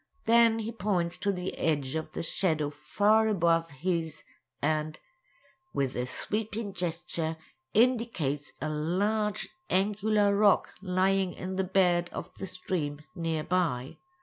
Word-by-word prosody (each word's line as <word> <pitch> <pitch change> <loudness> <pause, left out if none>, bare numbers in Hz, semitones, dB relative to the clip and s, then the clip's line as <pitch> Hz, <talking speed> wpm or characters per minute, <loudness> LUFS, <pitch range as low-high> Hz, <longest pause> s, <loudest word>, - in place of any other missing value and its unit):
Then 230 0 +5
he 225 0 -3
points 180 -6 -1
to 200 - +1
the 180 -1 -4
edge 145 -5 0
of 160 0 -4
the - - -3
shadow 155 -4 +1
far 215 +7 +2
above 170 -5 +2
his, 160 +1 -2 0.4
and, 155 +1 -1 0.8
with 135 -2 0
a 125 +1 -2
sweeping 215 - -3
gesture, 170 -2 -3 0.4
indicates 220 - +1
a 155 - -2
large 200 +8 0 0.2
angular 205 +1 +2
rock 205 -1 +4
lying 190 0 +1
in 185 +1 -5
the 190 - +1
bed 180 -2 +2
of - - -6
the 190 - -4
stream 165 -6 0
near 165 -2 -1
by. 155 -8 -1
180 Hz, 130 wpm, -29 LUFS, 160-205 Hz, 0.8 s, Then